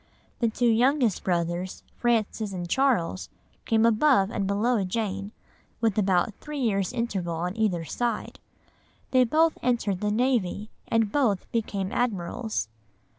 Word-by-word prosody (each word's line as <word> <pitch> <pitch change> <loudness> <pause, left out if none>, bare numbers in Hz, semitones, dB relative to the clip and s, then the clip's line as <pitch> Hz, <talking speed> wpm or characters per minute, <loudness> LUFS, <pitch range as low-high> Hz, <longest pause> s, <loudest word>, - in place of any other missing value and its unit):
The 235 - +2
two 240 +2 -1
youngest 240 0 +3
brothers, 175 +1 -2
Francis 220 -3 0
and 175 -2 -4
Charles, 170 - +1 0.4
came 225 0 +3
above 230 -3 +4
and 200 -2 -1
below 210 +2 +1
Jane, 200 0 -3 0.5
with 225 -4 +1
about 195 0 +2
three 300 0 -6
years' 205 -7 0
interval 200 -9 -2
on 175 +3 -3
either 195 -7 0
side. 235 - -3 0.7
They 255 -1 +5
both 320 +6 +2
entered 230 -6 0
the 210 - 0
navy, 215 -3 0 0.2
and 225 -2 +1
both 225 -9 +1
became 200 -4 -2
admirals. 220 - -2
215 Hz, 130 wpm, -26 LUFS, 190-240 Hz, 0.7 s, They